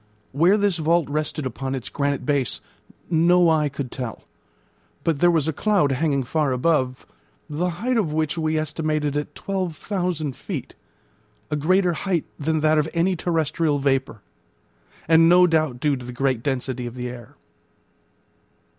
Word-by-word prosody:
Where 170 +9 +4
this 200 -4 +1
vault 165 0 +2
rested 150 0 -2
upon 130 +2 -3
its 130 - -5
granite 140 -1 -2
base 140 -4 0 0.5
no 175 +2 +4
eye 155 -2 +2
could 135 -2 -6
tell; 125 -4 -6 0.8
but 160 -4 0
there 175 - +5
was 160 -3 +2
a 160 - 0
cloud 190 -5 +2
hanging 140 0 +1
far 150 +2 0
above, 130 -1 0 0.4
the 165 +5 -1
height 230 +9 -1
of 185 -9 0
which 155 0 0
we 155 -1 0
estimated 155 -1 -1
at 150 0 -3
12,000 180 -5 -3
feet, - - -6 0.8
a - - +1
greater 180 +4 +2
height 175 -1 -1
than 155 +1 0
that 155 0 +4
of 150 +1 0
any 180 +3 +2
terrestrial 160 -3 0
vapour, 135 -5 -1 0.8
and 165 +1 +6
no 180 +1 +7
doubt 155 -7 +1
due 150 0 +1
to 125 -2 -8
the 125 - -6
great 130 -1 0
density 130 -2 -2
of 120 - -8
the 125 0 -4
air. 120 -1 -10
155 Hz, 155 wpm, -23 LUFS, 135-170 Hz, 0.8 s, no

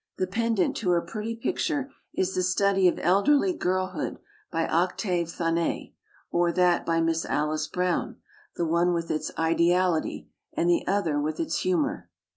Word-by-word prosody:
The 185 - +1
pendant 225 0 0
to 195 - -1
her 175 -1 +3
pretty 215 +5 -5
picture 285 +2 -2 0.2
is 190 0 -1
the 185 - 0
study 190 +1 +3
of 175 - +2
elderly 285 - +3
girlhood 185 - -2 0.3
by 165 -2 0
Octave 175 0 0
Thanet, 165 0 -1 0.4
or 175 0 +2
that 180 0 +2
by 165 0 +2
Miss 165 0 +1
Alice 155 +1 -1
Brown, 180 +2 -1 0.4
the 170 - -1
one 170 +2 +2
with 165 0 -2
its 155 - -2
ideality, 170 +1 +1 0.3
and 170 - 0
the 175 - +2
other 170 -7 +1
with 155 +2 -3
its 325 - -1
humor. 310 -6 -1
180 Hz, 155 wpm, -26 LUFS, 165-200 Hz, 0.4 s, her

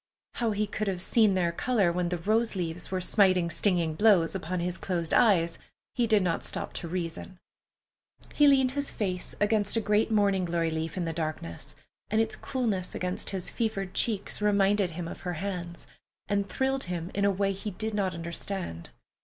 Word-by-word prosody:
How 235 -2 0
he 210 0 0
could 210 +1 -3
have 190 -2 -1
seen 210 +1 +3
their 175 -2 +1
color 200 -1 +1
when 175 0 -1
the 175 - -1
"rose 220 +6 +1
leaves" 175 -1 -4
were 185 -1 -2
smiting 185 -3 +3
stinging 170 -2 +2
blows 190 -3 +4
upon 185 -1 -3
his 175 +1 -2
closed 170 -3 -2
eyes, 170 -7 +4 0.3
he 240 -2 +1
did 215 -3 +4
not 170 -2 0
stop - - -3
to 170 - -3
reason. 175 +1 -5 1.0
He 295 - +5
leaned 265 -2 +5
his 285 +1 0
face 185 -5 -3
against 205 0 +2
a - - +4
great 210 0 +2
morning 200 -3 +2
glory 170 -1 0
leaf 160 +2 -3
in 175 - -1
the 165 - -2
darkness, 155 - -4 0.3
and 215 +2 +2
its 225 0 +1
coolness 220 -9 -2
against 180 0 -3
his 190 -3 -4
fevered 195 -5 -2
cheeks 210 -2 -1
reminded 205 -1 +3
him 170 0 -5
of - - -8
her 180 -1 -3
hands, 175 -1 -5 0.4
and 200 -1 0
thrilled 265 +3 0
him 175 -1 -4
in 200 - 0
a 200 - +5
way 195 0 +1
he 195 +2 -5
did 215 +3 -4
not 195 -3 0
understand. 170 - -4
190 Hz, 185 wpm, -28 LUFS, 175-210 Hz, 1.0 s, He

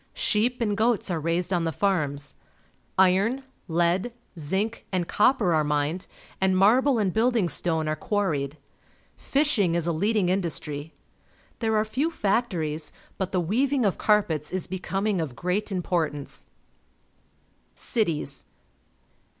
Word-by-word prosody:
Sheep 240 +4 +1
and 210 -3 +1
goats 220 -3 +1
are 165 - 0
raised 170 +4 0
on 175 -2 +1
the 165 - 0
farms. 145 -5 -1 0.6
Iron, 195 +8 +3 0.2
lead, 175 +6 +1 0.3
zinc, 195 +9 -2
and 180 -3 -1
copper 210 -5 +3
are 155 -1 +3
mined, 150 +4 -1 0.3
and 190 -1 +3
marble 245 +7 +4
and 200 -5 +1
building 230 -4 +2
stone 160 -2 0
are 155 - 0
quarried. 155 -8 -1 0.6
Fisliing 240 - +1
is 170 -2 +1
a 170 - +1
leading 200 +3 +1
industry. 160 -5 -2 0.7
There 220 -2 +1
are 215 - +2
few 265 +9 0
factories, 180 - -1 0.3
but 190 -1 -2
the 185 - +1
weaving 250 - +1
of 195 - 0
carpets 165 -8 +1
is 185 0 -1
becoming 190 +1 -1
of 140 -6 -4
great 180 - -1
importance. 165 -6 -2 1.3
Cities. 160 - -2
185 Hz, 130 wpm, -26 LUFS, 160-215 Hz, 1.3 s, marble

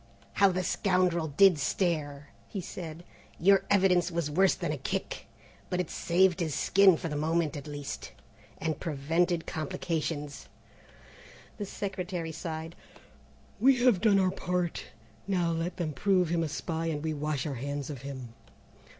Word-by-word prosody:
"How 200 -1 +5
the 185 0 -1
scoundrel 180 -4 +1
did 175 +3 +5
stare," 145 -1 -1 0.2
he 200 - -5
said; 170 -2 -7 0.4
"your 195 +2 +5
evidence 185 -3 +4
was 165 -3 -2
worse 190 +5 +4
than - - -3
a - - -2
kick, - - -4 0.4
but 180 - -1
it 180 - -2
saved 180 +1 +2
his 160 -5 -1
skin 195 -2 +5
for - - -4
the 150 - -4
moment 160 +1 0
at 145 0 -7
least, 145 - -6 0.5
and 160 -2 -2
prevented 165 +2 0
complications." 155 -2 -3 1.1
The 205 - -3
Secretary 185 -4 -4
sighed. 160 0 -6 0.8
"We 260 +4 +5
have 240 -8 +4
done 210 -3 +5
our 185 -1 +3
part. 180 -2 -2 0.4
Now 180 -4 +1
let 165 +2 -2
them 160 -4 -2
prove 180 +4 +2
him 170 0 +1
a 160 - -1
spy 165 +2 -3
and 150 -2 -2
we 160 -1 -1
wash 150 -2 -2
our 150 - -2
hands 140 +3 -4
of 135 -4 -7
him. 130 -4 -7
165 Hz, 155 wpm, -29 LUFS, 150-185 Hz, 1.1 s, How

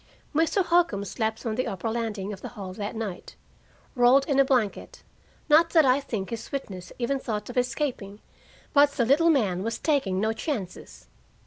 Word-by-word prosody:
Mr. 330 +5 +2
Holcombe 335 - +2
slept 220 +3 -3
on 225 - -1
the 255 +3 -1
upper 195 +4 -4
landing 220 -3 -3
of 190 - -10
the - - -6
hall 190 -2 -6
that 205 +3 -5
night, 215 -5 -6 0.6
rolled 255 +2 +5
in 275 -3 +1
a - - +7
blanket 250 -7 -1 0.4
not 325 +2 +5
that 320 -4 +6
I 260 +1 +4
think 220 -8 -5
his 230 -1 -6
witness 190 -10 -6
even 260 +3 -1
thought 215 -3 -4
of - - -13
escaping, 245 -5 -3 0.5
but 285 0 +5
the 240 - +1
little 300 +7 +4
man 205 - +2
was 230 +3 -3
taking 260 - 0
no 220 +2 +1
chances. 220 - -6
235 Hz, 180 wpm, -26 LUFS, 205-280 Hz, 0.6 s, a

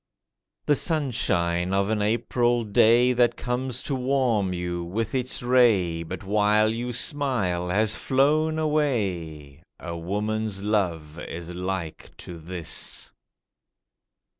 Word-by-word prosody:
The 145 - +3
sunshine 95 - 0
of 100 +1 +1
an 110 -1 0
April 120 +2 +1
day 115 +4 +4
That 120 -1 +2
comes 125 0 -3
to 140 - -3
warm 125 -7 +1
you 90 -1 -3
with 100 +6 -3
its 130 -1 -2
ray, 110 -10 +3
But 85 +2 -6
while 105 +2 +3
you 120 +2 -3
smile 115 - -1
has 110 +3 +2
flown 155 +4 +2
away— 95 - -1 0.2
A 85 0 -6
woman's 105 +3 -2
love 85 -7 -1
is 85 +1 -7
like 90 -2 -4
to 85 -2 -9
this. 85 0 -5
105 Hz, 115 wpm, -25 LUFS, 90-125 Hz, 0.2 s, day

